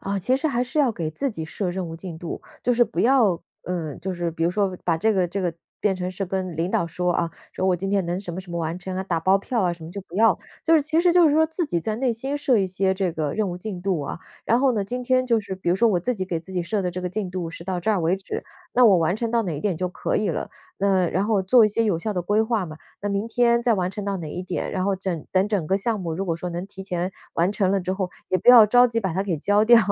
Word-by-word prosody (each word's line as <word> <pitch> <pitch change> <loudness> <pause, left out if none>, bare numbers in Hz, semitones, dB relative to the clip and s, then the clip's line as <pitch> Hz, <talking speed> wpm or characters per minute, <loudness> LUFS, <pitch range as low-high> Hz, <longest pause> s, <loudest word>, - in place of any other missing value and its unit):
啊， 200 0 -2
其 250 +8 +1
实 315 - -1
还 245 -2 0
是 245 +5 -4
要 270 -6 +3
给 160 -5 -3
自 275 - -2
己 160 -7 -5
设 180 +3 -3
任 180 -1 -4
务 165 - -7
进 170 -2 -8
度， 170 - -6 0.2
就 245 - +2
是 240 0 +4
不 230 - -3
要 230 -9 +3 0.2
嗯， 165 -5 -4
就 190 +2 -3
是 175 -1 -2
比 165 0 -2
如 170 - +2
说 190 0 0
把 170 -2 +2
这 220 +7 +2
个 185 -3 +2
这 195 +3 -3
个， 175 -3 -1 0.3
变 205 -2 +2
成 180 0 -3
是 195 +2 -3
跟 185 -3 -3
领 170 +3 -1
导 170 - +1
说 180 +2 -1
啊， 170 0 0 0.2
说 190 - -1
“我 180 - +3
今 195 +3 -3
天 195 -3 +1
能 175 +2 -1
什 180 -3 -6
么 180 - -4
什 185 -2 -13
么 170 - -3
完 165 +1 -2
成 185 0 -5
啊”， 190 - -1
打 170 -3 -1
包 190 +4 +4
票 230 +4 -2
啊 180 - +2
什 165 - -12
么， 160 - -8
就 200 - -6
不 180 - -16
要。 225 +1 +4 0.3
就 325 - +3
是 310 - +6
其 315 +3 0
实 345 0 +4
就 350 -2 +6
是 290 - +2
说 320 +1 +5
自 320 +1 -2
己 175 - 0
在 215 +6 -2
内 250 +1 +1
心 265 +5 -3
设 265 -4 +2
一 195 - +1
些 190 +1 0
这 190 -3 -1
个 155 -3 -2
任 210 -3 0
务 175 - -5
进 185 -2 -6
度 185 -4 0
啊， 140 - -5 0.3
然 235 - +4
后 270 -2 +4
呢， 215 -4 0
今 245 +5 -4
天 255 0 +2
就 230 -3 +3
是 195 -2 -6
比 185 -2 -4
如 175 - +3
说 235 +4 +4
我 180 -4 +1
自 250 +8 -1
己 190 -4 -3
给 170 -3 -3
自 190 +3 -12
己 180 -2 -1
设 205 +3 -1
的 180 - -1
这 180 +1 -5
个 180 - -2
进 190 -2 -3
度 180 -3 -4
是 170 - -9
到 180 -1 -2
这 220 - 0
儿 205 - +2
为 170 +3 +2
止， 190 - -6 0.3
那 245 -1 +6
我 195 - +6
完 170 +1 +2
成 225 +1 -2
到 235 -1 +2
哪 175 -6 -3
一 - - -7
点 195 -5 0
就 180 +2 -1
可 - - -2
以 210 - +1
了。 - - -3 0.3
那 190 -2 +2
然 190 +3 0
后 210 -3 +2
做 225 +3 +6
一 - - +1
些 225 +2 0
有 195 -7 +1
效 215 +4 -3
的 180 - -1
规 205 +5 +2
划 220 -3 0
嘛， 155 -2 -9 0.2
那 205 - -1
明 200 +3 -1
天 235 0 +3
再 235 -2 +3
完 185 -2 -1
成 200 +1 -6
到 200 -1 -1
哪 155 -3 -6
一 180 - -4
点， 180 -1 -3
然 185 -1 -1
后 195 - +1
整 180 -4 -4
等 190 +1 +3
整 195 -7 -1
个 190 - +2
项 215 +1 -1
目 165 -3 -3
如 195 +4 -2
果 170 - -1
说 180 +2 -5
能 175 +2 -5
提 195 -1 -10
前 180 -1 -3 0.2
完 175 +4 +2
成 195 -3 +1
了 200 - +2
之 185 +1 -2
后， 190 -1 -2 0.2
也 185 - +3
不 185 - -1
要 240 -3 +10
着 245 +4 +6
急 230 -1 -1
把 190 -6 -2
它 190 - 0
给 185 -5 -1
交 205 +7 +2
掉。 235 0 +8
190 Hz, 345 characters per minute, -24 LUFS, 175-220 Hz, 0.3 s, 要